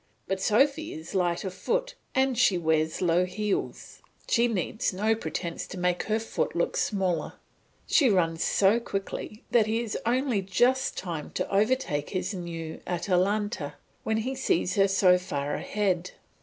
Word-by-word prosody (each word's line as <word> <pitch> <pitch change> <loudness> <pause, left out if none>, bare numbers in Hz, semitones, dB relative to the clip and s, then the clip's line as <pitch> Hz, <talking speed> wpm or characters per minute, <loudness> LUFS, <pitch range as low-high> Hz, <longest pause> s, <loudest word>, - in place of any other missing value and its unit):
But 190 0 -2
Sophy 275 +10 +2
is 160 +4 -9
light 175 -3 +1
of 190 -2 -4
foot - - -1 0.2
and 265 -1 +2
she 195 -4 +4
wears 160 0 +1
low 175 +1 +3
heels; 195 +3 -3 0.3
she 235 +1 +3
needs 220 +1 -1
no 210 +4 +1
pretence 175 -6 -4
to - - -8
make 180 0 +1
her 215 - +3
foot 225 - -2
look 170 - 0
smaller; 190 -4 0 0.5
she 275 -5 +4
runs 165 -4 +2
so 205 +4 +3
quickly 210 0 -5
that 225 -3 +4
he 225 +1 +1
has 220 - -4
only 245 -2 +1
just 245 +8 +1
time 165 -5 -4
to - - -1
overtake 205 - +1
this 185 +2 -2
new 165 -3 -6
Atalanta 180 -2 0 0.3
when 220 0 0
he 250 +4 -2
sees 185 -9 0
her 195 0 +4
so 185 -2 +4
far 145 -6 -3
ahead. 185 -4 -1
195 Hz, 155 wpm, -27 LUFS, 175-220 Hz, 0.5 s, she